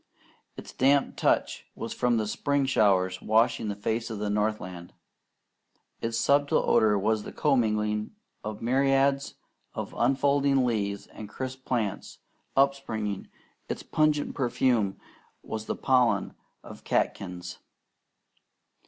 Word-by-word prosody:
Its - - -9
damp 140 +2 +2
touch - - 0
was - - -5
from 120 -1 +1
the 110 - 0
spring 140 +6 0
showers 95 -7 +2
washing 115 +1 +2
the 100 - -2
face 110 +3 -2
of 110 - -5
the 105 0 -2
northland. 105 -5 -2 1.1
Its 115 0 -2
subtle 145 +4 +2
odour 110 -3 +4
was 110 +2 +1
the - - -8
commingling 105 -6 +1 0.3
of 105 0 -6
myriads 135 +2 +2 0.4
of - - -5
unfolding 135 +1 +2
leaves 100 -4 -1
and 105 -2 -10
crisp 130 +3 -6
plants, 110 -6 -2 0.4
upspringing; 110 -8 0 0.4
its - - -4
pungent 155 -1 +1
perfume 120 -6 +1 0.4
was 110 0 -5
the - - -1
pollen 125 -6 +2 0.3
of - - -12
catkins. 90 -2 -2
115 Hz, 120 wpm, -27 LUFS, 105-135 Hz, 1.1 s, odour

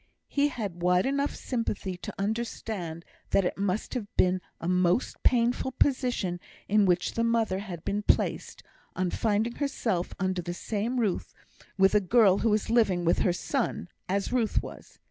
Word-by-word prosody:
He 285 0 +2
had 205 -11 -5
wide 180 +1 +3
enough 280 +1 0
sympathy 210 -6 -3
to - - -6
understand 200 -5 -3 0.2
that 195 - +3
it - - -1
must 200 +1 -2
have 240 -6 -3
been 185 0 +3 0.2
a 165 - -4
most 180 +4 +1
painful 245 +1 +2
position 245 -11 0 0.3
in 205 -1 +4
which 180 0 +1
the 230 - 0
mother 230 -5 +1
had 180 -5 -7
been 205 +1 -1
placed, - - 0 0.3
on 185 -1 0
finding 220 +2 0
herself 225 -10 -1
under 185 -1 0
the 175 0 -5
same 225 +6 -2
roof 210 -6 -1 0.4
with 195 0 +5
a 210 - +6
girl 200 -1 +4
who 230 - +2
was 215 +1 +1
living 200 -7 +3
with 170 - +3
her 185 - +3
son, 235 -1 -2 0.2
as 200 +4 -1
Ruth 235 -4 +1
was. - - -11
205 Hz, 165 wpm, -28 LUFS, 180-235 Hz, 0.4 s, a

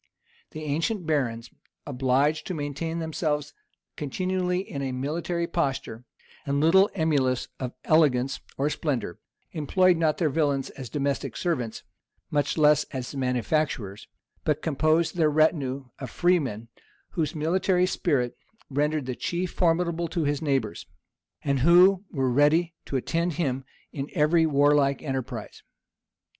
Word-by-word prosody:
The 155 -1 -8
ancient 165 +6 -1
barons, 120 -7 -1 0.3
obliged 135 +4 +1
to 185 - -3
maintain 150 +3 -3
themselves 155 -2 -2 0.4
continually 180 +4 -1
in 140 - -5
a 135 -1 -2
military 165 +6 -2
posture, 135 -8 -2 0.4
and 140 -1 -1
little 190 +6 +5
emulous 140 -7 +1
of 125 -2 -4
elegance 135 -5 +3 0.2
or 140 - +1
splendor, 130 - -2 0.3
employed 180 +4 +3
not 155 -2 +1
their 155 -4 +1
villains 140 -3 0
as 130 -3 -8
domestic 140 -2 -2
servants, 125 -11 -2 0.5
much 145 0 0
less 150 -1 +5
as 130 0 -6
manufacturers; 125 -4 -1 0.4
but 150 0 0
composed 160 +2 +1
their 160 -3 +4
retinue 145 -3 +1
of 130 -3 -6
freemen, 135 - 0 0.4
whose 160 -3 -2
military 180 +4 +2
spirit 140 -9 0 0.4
rendered 150 +1 0
the 130 - -3
chieftain 175 +5 -3
formidable 170 -1 +1
to 165 0 -2
his 145 -1 0
neighbors, 135 - -1 0.6
and 140 -3 +1
who 180 +6 +6
were 135 -4 0
ready 155 +6 +3
to - - -5
attend 170 +6 -1
him 135 -4 -2 0.3
in 140 -2 -5
every 160 +2 +4
warlike 145 -1 +3
enterprise. 135 -4 -5
150 Hz, 130 wpm, -26 LUFS, 135-165 Hz, 0.6 s, who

